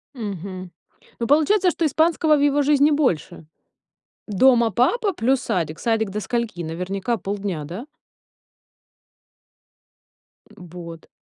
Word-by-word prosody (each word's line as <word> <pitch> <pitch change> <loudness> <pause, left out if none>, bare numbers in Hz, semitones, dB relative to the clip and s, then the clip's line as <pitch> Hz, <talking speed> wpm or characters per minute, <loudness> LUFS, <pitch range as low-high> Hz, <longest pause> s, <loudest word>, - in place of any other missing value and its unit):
Мгм. 185 -4 -6 0.5
Ну, 235 - -2
получается, 360 - +3
что 335 - -1
испанского 315 +1 +2
в - - -1
его 290 0 +3
жизни 290 +1 +4
больше. 185 - -1 0.8
Дома 235 +2 +4
папа 330 - +1
плюс 265 -3 +1
садик? 160 -3 -2
Садик 225 -3 0
до 210 +2 -3
скольки? 230 -6 -3
Наверняка 180 +7 -3
полдня, 195 -6 -4
да? 180 - -7 2.7
М, 180 - -12
вот. 170 -1 -10
225 Hz, 110 wpm, -22 LUFS, 185-285 Hz, 2.7 s, жизни